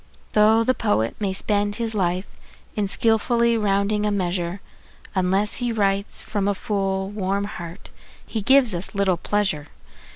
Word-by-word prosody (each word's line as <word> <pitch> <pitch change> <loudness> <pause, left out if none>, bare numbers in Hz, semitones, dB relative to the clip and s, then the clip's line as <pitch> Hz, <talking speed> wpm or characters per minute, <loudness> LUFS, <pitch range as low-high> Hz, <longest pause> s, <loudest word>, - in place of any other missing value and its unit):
Though 215 +2 +5
the 255 - +2
poet 205 - 0
may 200 -3 0
spend 205 +1 0
his 230 -1 -2
life 185 -1 0 0.5
in 210 -2 0
skilfully 235 +3 +2
rounding 205 0 +1
a 210 - +2
measure, 180 -2 -1 0.5
Unless 190 +2 +1
he 245 -1 -1
writes 200 -2 -1
from 205 -2 -2
a 205 - +1
full, 195 -1 -2
warm 200 -1 -1
heart 175 -3 -8 0.3
he 220 - -3
gives 260 0 +4
us 180 +4 -3
little 195 -3 +2
pleasure. 190 -6 0
205 Hz, 150 wpm, -23 LUFS, 190-215 Hz, 0.5 s, Though